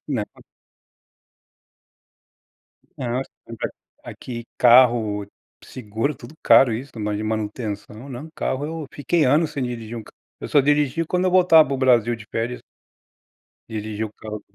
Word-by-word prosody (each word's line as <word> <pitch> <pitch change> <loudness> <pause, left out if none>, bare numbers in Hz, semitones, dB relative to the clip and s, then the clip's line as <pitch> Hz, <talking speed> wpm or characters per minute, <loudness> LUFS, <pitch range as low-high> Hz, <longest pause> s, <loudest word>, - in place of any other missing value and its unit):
Não. 125 -8 -1 2.7
Não, 125 +1 -2
esse - - -8 0.2
negócio 115 -1 -5 0.3
de - - -6
aqui 120 -2 -7
carro, 120 -4 +5 0.4
seguro, 115 +4 -3
tudo 155 - -12
caro 125 -4 +6
isso, 130 +5 -6
mais 105 0 -2
de 110 - -4
manutenção 110 +2 -4
não 130 +5 -7
carro 135 +2 -2
eu 160 -2 -5
fiquei 150 +3 0
anos 150 +4 +3
sem 140 -3 -3
dirigir 120 -2 -5
um 110 - -7
carro. - - -16 0.3
Eu - - -5
só 145 - +4
dirigia 145 +3 +2
quando 180 +3 0
eu 185 - +2
voltava 175 -5 +6
para 140 - 0
o - - -5
Brasil 120 -3 +3
de 110 -2 -13
férias. 115 +2 -3 1.1
Dirigir 110 0 -4
o 105 - -9
carro 105 -1 -8
125 Hz, 155 wpm, -22 LUFS, 110-145 Hz, 2.7 s, caro